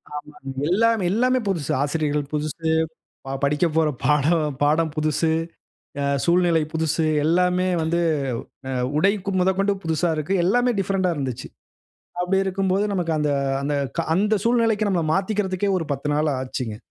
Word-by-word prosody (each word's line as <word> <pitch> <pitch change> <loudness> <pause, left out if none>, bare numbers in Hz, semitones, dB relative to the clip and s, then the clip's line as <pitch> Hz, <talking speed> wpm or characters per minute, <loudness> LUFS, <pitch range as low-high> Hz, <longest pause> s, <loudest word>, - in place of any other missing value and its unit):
ஆமாங்க. 145 -2 -8 0.2
எல்லாமே 225 +2 +2
எல்லாமே 255 +4 +2
புதுசு. 170 -8 -1
ஆசிரியர்கள் 145 0 0
புதுசு, 155 +2 -2 0.6
ப 135 - -4
படிக்கப்போற 155 +2 +2 0.2
பாடம் 150 +1 +2
பாடம் 155 +2 +2
புதுசு, 155 +1 +1 0.7
அ - - -1 0.2
சூழ்நிலை 170 -2 +3
புதுசு. 160 0 0 0.2
எல்லாமே 180 +3 +2
வந்து 170 +2 0 0.8
அ - - 0 0.2
உடை 195 +1 +1
மொதகொண்டு 195 +2 +2
புதுசா 165 +1 0
இருக்கு. 155 +6 -1
எல்லாமே 245 +6 +3
டிஃபரண்ட்டா 190 -2 0
இருந்துச்சு. 130 -4 -4 0.7
அப்படி 180 +2 +1
இருக்கும்போது, 190 +1 0
நமக்கு 175 -3 -1
அந்த 150 -1 +1 0.3
அந்த, 145 +1 -1 0.2
கா 165 - +1
அந்த 210 +3 +2
சூழ்நிலைக்கு 225 -3 +2
நம்மள 175 -4 +1
மாத்திக்கிறதுக்கே 195 0 0
ஒரு 165 - -4
10 140 +1 -5
நாளு 150 +1 +1
ஆச்சுங்க. 130 -4 -4
170 Hz, 135 wpm, -23 LUFS, 150-195 Hz, 0.8 s, சூழ்நிலை